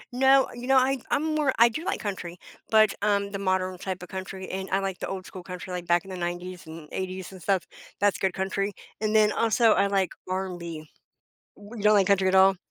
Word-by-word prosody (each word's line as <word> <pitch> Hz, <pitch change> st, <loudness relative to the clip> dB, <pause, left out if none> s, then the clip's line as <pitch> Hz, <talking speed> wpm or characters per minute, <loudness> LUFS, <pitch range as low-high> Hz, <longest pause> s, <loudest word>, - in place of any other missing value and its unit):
No, 265 Hz, +1 st, +5 dB
you 240 Hz, +1 st, -7 dB
know, 270 Hz, -, +5 dB
I 260 Hz, +1 st, +3 dB
I'm 290 Hz, -, +1 dB
more 300 Hz, -3 st, +2 dB
I 235 Hz, +1 st, +7 dB
do 275 Hz, +8 st, -5 dB
like -, -, -1 dB
country, 185 Hz, -4 st, -5 dB, 0.3 s
but, 215 Hz, -2 st, +5 dB
um, 200 Hz, -1 st, +1 dB
the 195 Hz, -, -4 dB
modern 185 Hz, -1 st, -1 dB
type 185 Hz, -1 st, -5 dB
of -, -, -10 dB
country, 190 Hz, 0 st, -6 dB
and 190 Hz, 0 st, -5 dB
I 190 Hz, -, +3 dB
like 195 Hz, -1 st, -3 dB
the -, -, -4 dB
old 190 Hz, -1 st, -5 dB
school 185 Hz, -, -9 dB
country, 180 Hz, +1 st, -7 dB
like, 175 Hz, -1 st, -5 dB
back 175 Hz, 0 st, +3 dB
in 195 Hz, -, -9 dB
the 185 Hz, -, -5 dB
'90s 175 Hz, 0 st, -5 dB
and 160 Hz, -1 st, -10 dB
'80s 185 Hz, 0 st, -5 dB
and 185 Hz, -, -12 dB
stuff. 190 Hz, 0 st, +1 dB, 0.3 s
That's 205 Hz, 0 st, +2 dB
good 190 Hz, -2 st, 0 dB
country. 195 Hz, +1 st, -1 dB, 0.3 s
And 215 Hz, 0 st, 0 dB
then, 215 Hz, -1 st, +5 dB
also, 230 Hz, 0 st, +3 dB
I 200 Hz, -, +3 dB
like 195 Hz, -2 st, +1 dB, 0.2 s
R&B. 185 Hz, 0 st, -2 dB, 1.0 s
W 205 Hz, +3 st, -12 dB
you 210 Hz, -, -6 dB
don't 210 Hz, -, +6 dB
like 195 Hz, -2 st, +4 dB
country 195 Hz, -1 st, +3 dB
at 185 Hz, -, +2 dB
all? 190 Hz, 0 st, +6 dB
195 Hz, 230 wpm, -26 LUFS, 185-215 Hz, 1.0 s, I